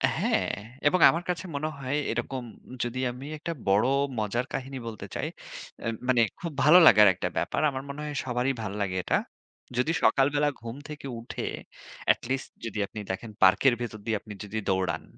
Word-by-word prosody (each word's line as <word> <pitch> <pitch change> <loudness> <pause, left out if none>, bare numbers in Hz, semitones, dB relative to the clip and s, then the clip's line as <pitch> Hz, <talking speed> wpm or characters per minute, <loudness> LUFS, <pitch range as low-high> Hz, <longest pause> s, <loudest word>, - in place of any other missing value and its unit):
হ্যাঁ, - - +1 0.4
এবং 185 +5 +3
আমার 170 +2 0
কাছে 175 0 -1
মনে 145 +2 -1
হয় 135 0 -2 0.2
এরকম 120 +2 -3 0.4
যদি 120 +1 -3
আমি 125 +3 -9
একটা 170 +3 -4 0.2
বড় 100 +3 +4 0.3
মজার 110 +4 -1
কাহিনী 135 0 -4
বলতে 110 -2 -6
চাই, - - -2 0.6
আ - - 0 0.2
মানে 125 -2 +4 0.2
খুব 170 - -4
ভালো 155 +4 +8
লাগার 105 +1 +8
একটা 90 - -3
ব্যাপার। - - 0
আমার 135 -1 -5
মনে 140 +2 -6
হয় 150 - -4
সবারই 125 +1 0
ভালো 100 -1 -4
লাগে 95 -2 -1
এটা। - - +1 0.6
যদি 125 +6 +2
সকালবেলা 145 +2 +4
ঘুম 115 0 -6
থেকে 150 -2 -7
উঠে 115 - -6 0.7
at - - -17
least 135 +1 -1 0.2
যদি 110 -2 -5
আপনি 105 - -8
দেখেন 110 +4 -5
পার্কের 95 +8 +6
ভেতর 110 -3 -5
দিয়ে 115 -2 +1
আপনি 105 - -9
যদি 105 +2 -5
দৌড়ান। 95 -4 0
125 Hz, 180 wpm, -27 LUFS, 110-140 Hz, 0.7 s, ভালো